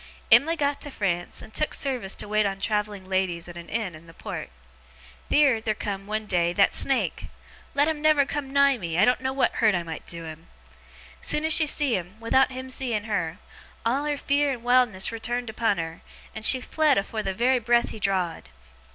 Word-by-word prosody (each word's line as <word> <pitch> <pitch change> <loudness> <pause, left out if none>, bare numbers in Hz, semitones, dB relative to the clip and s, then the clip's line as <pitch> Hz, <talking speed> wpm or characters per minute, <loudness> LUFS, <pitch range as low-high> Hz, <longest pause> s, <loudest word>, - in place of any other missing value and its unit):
'Em'ly 325 +4 +6
got 285 -2 -1
to 290 - -5
France, 175 -8 -2
and 220 - -14
took 305 - 0
service 250 -8 -1
to - - -4
wait 215 +1 +2
on 195 -1 -2
travelling 210 -1 -2
ladies 185 -3 -1
at 175 - -10
a - - -7
inn 195 +2 -4
in 155 +2 -13
the 165 - -15
port. - - -6 0.8
Theer, 280 -6 +4
theer 220 -1 -1
come, 200 -1 -5
one 215 +1 -2
day, 175 -3 +1
that 200 +2 +3
snake. 270 -1 0 0.5
Let 290 +1 +3
him 315 -2 -2
never 305 -2 +4
come 275 -1 -4
nigh 280 -2 +4
me. 170 -3 -3
I 190 - +5
doen't 250 +1 +2
know 260 0 -1
what 270 0 +1
hurt 215 -3 +3
I 175 - -1
might 165 -1 -8
do 170 -1 -5
him! 160 +1 -10 0.7
Soon 300 - +1
as 320 - +6
she 310 -1 +5
see 285 -4 +2
him, 185 +3 -6
without 260 +4 +2
him 260 0 -7
seeing 240 -5 -1
her, 180 -6 -2 0.5
all 265 +5 +1
her 295 -1 -1
fear 285 0 +1
and 240 -3 -6
wildness 245 -6 +2
returned 235 +1 -3
upon 220 -2 0
her, 165 0 -5 0.3
and 220 - -7
she 255 +3 +5
fled 305 +1 +2
afore 215 +2 -2
the 190 -2 -3
very 250 +4 +2
breath 240 +1 +2
he 220 - -8
draw'd. 185 - -1
220 Hz, 210 wpm, -25 LUFS, 190-265 Hz, 0.8 s, Em'ly